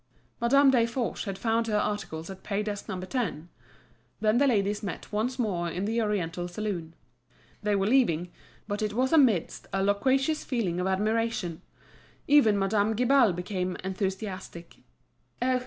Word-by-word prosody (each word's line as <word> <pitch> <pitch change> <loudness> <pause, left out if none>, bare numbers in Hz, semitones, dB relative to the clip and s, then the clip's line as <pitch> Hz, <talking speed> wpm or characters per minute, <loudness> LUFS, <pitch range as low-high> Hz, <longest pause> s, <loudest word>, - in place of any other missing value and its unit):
Madame 270 +3 +5
Desforges 235 -1 0
had 195 -2 -4
found 225 +2 0
her 210 -1 +1
articles 195 -6 -3
at 190 - -10
pay 205 0 -2
desk 205 -1 -5
No. 185 - -3
10. 185 - -3 0.7
Then 215 +2 +3
the 280 - +4
ladies 205 -4 +1
met 200 -4 -6
once 225 +5 -1
more 185 -8 -1
in 180 +4 -3
the 225 +2 0
oriental 180 -5 -1
saloon. 175 -4 -4 0.7
They 210 -1 +1
were 195 -1 +1
leaving, 190 -8 +2 0.4
but 205 0 -3
it 210 -1 -1
was 260 +6 +1
amidst 245 - +3
a 195 0 0
loquacious 265 +9 +1
feeling 205 - -1
of 180 - 0
admiration. 210 -3 -1 0.7
Even 275 -8 +5
Madame 205 +2 +1
Guibal 250 -1 +4
became 180 +1 -3
enthusiastic. 190 -2 -5 0.6
"Oh! 255 +1 +2
210 Hz, 150 wpm, -28 LUFS, 190-235 Hz, 0.7 s, Madame